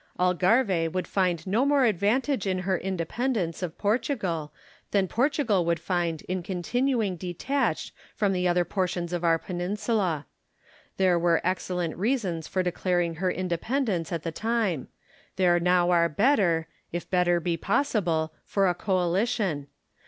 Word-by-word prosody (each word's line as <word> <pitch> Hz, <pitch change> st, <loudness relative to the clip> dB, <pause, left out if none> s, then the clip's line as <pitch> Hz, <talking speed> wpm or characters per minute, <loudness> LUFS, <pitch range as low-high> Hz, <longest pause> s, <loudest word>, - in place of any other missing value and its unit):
Algarve 180 Hz, -1 st, +2 dB
would 185 Hz, 0 st, -2 dB
find 180 Hz, -4 st, 0 dB
no 210 Hz, +7 st, +2 dB
more 280 Hz, -2 st, +4 dB
advantage 220 Hz, -, +1 dB
in 185 Hz, -1 st, +1 dB
her 190 Hz, -1 st, +2 dB
independence 190 Hz, +1 st, -2 dB
of 175 Hz, -3 st, -4 dB
Portugal, 200 Hz, -, -1 dB, 0.4 s
than 195 Hz, -2 st, +2 dB
Portugal 245 Hz, -, +1 dB
would 170 Hz, 0 st, 0 dB
find 170 Hz, -4 st, -1 dB
in 185 Hz, 0 st, -3 dB
continuing 210 Hz, +4 st, 0 dB
detached 185 Hz, -, -2 dB, 0.2 s
from 200 Hz, -3 st, +1 dB
the 180 Hz, -1 st, +1 dB
other 175 Hz, 0 st, +2 dB
portions 180 Hz, -2 st, -2 dB
of 175 Hz, -1 st, -2 dB
our 165 Hz, -1 st, +4 dB
peninsula. 185 Hz, -, -2 dB, 0.7 s
There 185 Hz, -2 st, +3 dB
were 170 Hz, -1 st, +3 dB
excellent 180 Hz, -2 st, -1 dB
reasons 190 Hz, -, -1 dB
for 185 Hz, -, 0 dB
declaring 175 Hz, -2 st, 0 dB
her 185 Hz, +2 st, 0 dB
independence 185 Hz, -, -1 dB
at 170 Hz, -2 st, -3 dB
the 165 Hz, -, -3 dB
time; 215 Hz, -, -1 dB, 0.5 s
there 175 Hz, -2 st, +3 dB
now 180 Hz, 0 st, +3 dB
are 170 Hz, -1 st, +4 dB
better, 175 Hz, -, +2 dB, 0.2 s
if 175 Hz, 0 st, -4 dB
better 175 Hz, -1 st, +2 dB
be 170 Hz, 0 st, -1 dB
possible, 175 Hz, -, 0 dB
for 195 Hz, -1 st, +1 dB
a 180 Hz, -, +2 dB
coalition. 185 Hz, -, 0 dB
180 Hz, 140 wpm, -27 LUFS, 170-210 Hz, 0.7 s, more